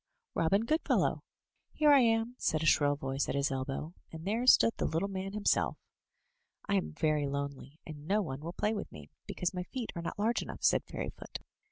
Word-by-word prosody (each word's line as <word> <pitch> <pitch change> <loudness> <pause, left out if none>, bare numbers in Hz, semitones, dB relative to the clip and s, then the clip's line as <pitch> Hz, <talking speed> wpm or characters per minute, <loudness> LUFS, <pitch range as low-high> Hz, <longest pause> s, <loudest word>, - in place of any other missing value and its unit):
Robin 195 +7 +2
Goodfellow!" 315 +7 +1 0.5
"Here 300 -1 +4
I 280 - +8
am,*' 225 -1 +2
said 155 -1 0
a - - 0
shrill 145 -2 +4
voice 135 0 -2
at - - -1
his 140 0 +1
elbow; 135 +4 -3 0.2
and 160 0 -8
there 225 +5 0
stood 230 -2 +7
the - - 0
little 165 +5 0
man 195 0 -4
himself. 210 -1 +1 0.9
"I 200 - 0
am 195 -4 0
very 155 -2 +1
lonely, 140 0 -5
and 150 -1 -9
no 205 +3 +2
one 135 -5 -5
will 165 +3 -5
play 210 +3 0
with 205 - -5
me, 75 -1 -12 0.2
because 180 - -2
my 180 - -3
feet 235 +5 -5
are 170 - -3
not 170 - -5
large 220 +3 +1
enough," - - -8
said - - +3
Fairyfoot. - - -6
170 Hz, 200 wpm, -32 LUFS, 145-210 Hz, 0.9 s, I